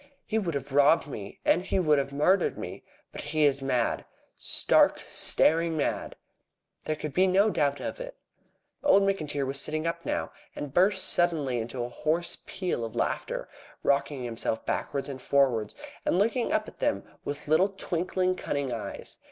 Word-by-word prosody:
"He 220 - 0
would 170 -7 -2
have 140 0 -4
robbed 145 +4 +5
me. 105 -9 -8
And 180 - +3
he 190 - -1
would 155 -6 +4
have 140 0 -2
murdered 175 +7 +2
me. - - -6 0.3
But - - -7
he 155 -1 0
is 140 -1 +2
mad 125 -3 0 0.3
stark, - - +3
staring 165 0 +2
mad!" 145 - -1 0.7
There 155 - 0
could 150 -1 -5
be 185 +1 +4
no 200 +3 +4
doubt 145 -4 +1
of - - -5
it. - - -7 0.7
Old 280 -9 +5
McIntyre 155 -8 0
was 135 +1 0
sitting 155 +2 -1
up 170 0 -2
now, - - -2 0.2
and 145 -2 -6
burst 190 +3 +3
suddenly 155 -8 +1
into 120 +2 -3
a 120 - -4
hoarse 160 +6 -1
peal 185 -10 -2
of 115 -2 -5
laughter, - - -2 0.4
rocking 140 -1 +1
himself 115 -1 -2
backwards 140 -1 -2
and 135 -2 -6
forwards, 125 -7 +2 0.3
and - - +1
looking 230 +5 +1
up 215 0 +1
at - - -12
them 290 0 0 0.2
with 145 +1 -5
little 160 +6 +4
twinkling, 185 -1 -1
cunning 140 -7 -2
eyes. 110 -4 -6
155 Hz, 170 wpm, -28 LUFS, 140-185 Hz, 0.7 s, robbed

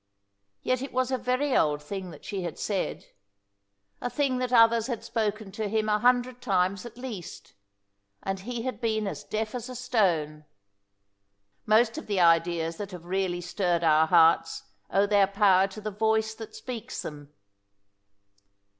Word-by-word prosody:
Yet 255 0 0
it 270 - -6
was 255 0 0
a 260 - +1
very 255 +3 0
old 150 -1 +2
thing 190 +3 -6
that 155 -4 -13
she 195 -2 -4
had 175 - -5
said 200 -3 -3 1.0
a 245 - -2
thing 255 0 0
that 250 -1 -2
others 230 -1 +5
had 235 -4 -4
spoken 220 -3 -2
to 215 +2 -3
him 215 +1 0
a 210 0 +2
hundred 245 +1 +2
times 190 0 0
at 235 - -14
least, 235 -9 -8 0.7
and 195 0 -2
he 235 +4 -5
had 255 0 -4
been 220 -2 0
as 155 -8 -5
deaf 215 0 -3
as 250 0 -5
a 255 - -7
stone. 175 -12 0 1.2
Most 225 +6 +3
of - - -11
the 200 -3 0
ideas 165 -1 +3
that 205 -2 -5
have 180 -3 -10
really 180 -1 -1
stirred 175 -1 -1
our 160 0 +4
hearts 165 -1 +4 0.3
owe 195 +1 +3
their 200 -1 +4
power 195 -1 +4
to 195 +2 -10
the 215 0 -4
voice 220 +1 +1
that 220 -1 -10
speaks 245 -4 -6
them. 145 -1 -8
210 Hz, 165 wpm, -27 LUFS, 180-240 Hz, 1.2 s, others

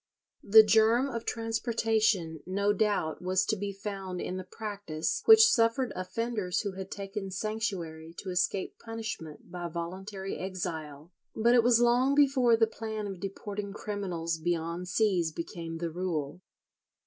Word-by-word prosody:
The 220 +2 +8
germ 225 +4 +4
of 230 -3 -5
transportation 225 - 0
no 200 +2 +1
doubt 205 -6 0
was 185 +1 +1
to 215 - +1
be 200 0 -3
found 195 -2 -5
in 185 - -3
the 185 - -5
practice 185 -5 -4
which 445 0 +9
suffered 235 - +2
offenders 210 0 -2
who 205 - -3
had 190 0 -7
taken 195 0 -5
sanctuary 185 -6 -4
to 190 - -5
escape 185 +1 -1
punishment 220 -10 -7
by 175 -1 -4
voluntary 190 +4 -5
exile,[41:1] 170 0 -6
but 235 +1 +6
it 245 - +6
was 235 0 +4
long 245 +3 +4
before 265 -5 +4
the 225 - +5
plan 220 -1 -5
of 195 -3 -6
deporting 200 +1 -5
criminals 180 -6 -3
beyond 170 +1 -2
seas 180 -4 +1
became 165 0 -6
the 165 0 -3
rule. 170 -2 -3
195 Hz, 145 wpm, -29 LUFS, 175-225 Hz, -, which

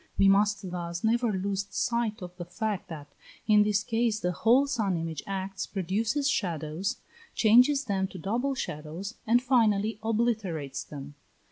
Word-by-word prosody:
We 195 - +5
must 200 -1 +2
thus 170 -1 -4
never 235 +1 +2
lose 195 0 -2
sight 230 0 -1
of 180 0 -9
the 175 - -6
fact 200 +1 -3
that 145 -3 -9 0.3
in 210 -1 +5
this 210 -1 +2
case 225 -2 0
the 180 - 0
whole 235 +10 +4
sun 220 -10 0
image 165 -2 -4
acts, 195 0 -4
produces 215 - -1
shadows, 175 - -1 0.4
changes 250 +6 +5
them 195 -3 0
to 190 - -10
double 240 +10 -1
shadows, 160 - -5
and 240 +3 +4
finally 220 -4 +2
obliterates 215 - -1
them. 145 -1 -9
200 Hz, 150 wpm, -28 LUFS, 180-225 Hz, 0.4 s, We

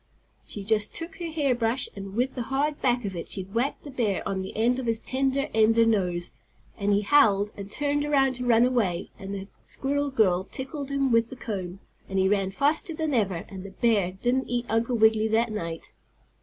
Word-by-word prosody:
She 205 - -6
just 210 0 +2
took 330 +2 -4
her 345 -2 -4
hair 295 -5 +1
brush 240 +1 0
and 195 0 -7
with 250 +3 0
the 250 - -4
hard 280 +5 -1
back 245 -2 +1
of 195 -2 -4
it 170 - -6
she 190 - -1
whacked 230 +9 -2
the 285 - -8
bear 225 -7 -1
on 190 -1 -2
the 190 - -7
end 245 +3 +2
of 255 - -4
his 230 -1 +2
tender 270 +2 0
ender 225 +1 +4
nose, 180 -6 0 0.4
and 200 0 0
he 200 0 +3
howled, 210 -5 +4
and 200 -1 -8
turned 290 +4 0
around 275 -3 +3
to 250 - -4
run 235 0 +5
away, 210 -9 0
and 195 +1 -5
the 195 0 -6
squirrel 285 +1 -1
girl 190 -8 +2
tickled 270 - -6
him 275 -2 +1
with 230 0 +3
the - - -8
comb, 195 -6 -5 0.3
and 195 - -2
he 190 0 +3
ran 195 -1 +1
faster 295 - +1
than 315 -2 -1
ever, 195 -8 0
and 190 -2 -8
the 195 - -8
bear 200 -2 +1
didn't 245 +7 -1
eat 245 0 -1
Uncle 230 +2 +1
Wiggily 220 0 +4
that 225 +1 +1
night. 165 -6 -5
225 Hz, 210 wpm, -26 LUFS, 195-265 Hz, 0.4 s, run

